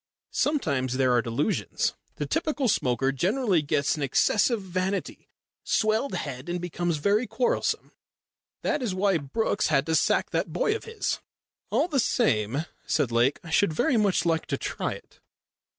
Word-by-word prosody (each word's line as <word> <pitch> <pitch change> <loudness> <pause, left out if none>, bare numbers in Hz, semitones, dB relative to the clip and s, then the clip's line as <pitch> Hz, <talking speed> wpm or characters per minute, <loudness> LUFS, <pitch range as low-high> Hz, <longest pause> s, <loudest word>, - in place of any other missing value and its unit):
Sometimes 140 - 0
there 130 -2 +3
are 120 - +4
delusions. 120 - -1 0.2
The - - -3
typical 305 -4 0
smoker 135 - +1
generally 190 - +1
gets 145 -1 +1
an 150 - -6
excessive 210 - +2
vanity 190 +1 -3 0.3
swelled 220 +5 +1
head 135 +1 -5
and 175 +1 -1
becomes 175 -1 -2
very 205 +10 +1
quarrelsome. 225 +4 0 0.7
That 295 - 0
is 215 -7 -2
why 190 -2 +2
Brookes 205 +9 0
had 145 -3 +2
to 160 - -1
sack 160 - +2
that - - -1
boy 440 -4 +1
of 450 - -6
his." 455 -2 -2 0.5
"All - - +2
the 295 -6 0
same," 135 - +1 0.2
said 140 -6 +1
Lake, 120 +4 +2
"I 165 - -9
should 165 -1 +3
very 240 - +2
much 205 -6 +2
like 165 -1 +1
to - - -1
try - - -3
it." - - -14
175 Hz, 160 wpm, -26 LUFS, 140-225 Hz, 0.7 s, are